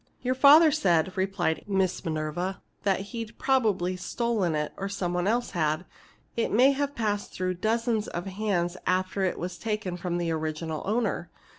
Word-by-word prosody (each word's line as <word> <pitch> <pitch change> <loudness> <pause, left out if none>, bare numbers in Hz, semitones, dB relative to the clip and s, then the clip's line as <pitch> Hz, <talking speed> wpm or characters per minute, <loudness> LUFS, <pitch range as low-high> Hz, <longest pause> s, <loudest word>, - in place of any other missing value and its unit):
"Your 255 0 +1
father 295 +4 +8
said," 185 - +2
replied 190 -4 0
Miss 190 -3 0
Minerva, 160 +4 -2 0.2
"that 195 -2 +1
he'd 230 -1 -6
probably 210 -9 +1
stolen 200 -3 -1
it, 150 -1 -2
or 195 0 -4
somebody 180 -2 -1
else 240 +3 +1
had. 155 -1 0 0.5
It 230 - 0
may 255 +5 +6
have 285 +1 -2
passed 210 -3 -2
through 185 0 -1
dozens 225 -1 +1
of 175 +2 -4
hands 190 -3 -1
after 185 +2 0
it 185 - -1
was 180 0 -5
taken 210 -4 -2
from 175 -1 -2
the 170 -1 -1
original 155 0 -3
owner. 210 -5 0
190 Hz, 160 wpm, -27 LUFS, 175-225 Hz, 0.5 s, father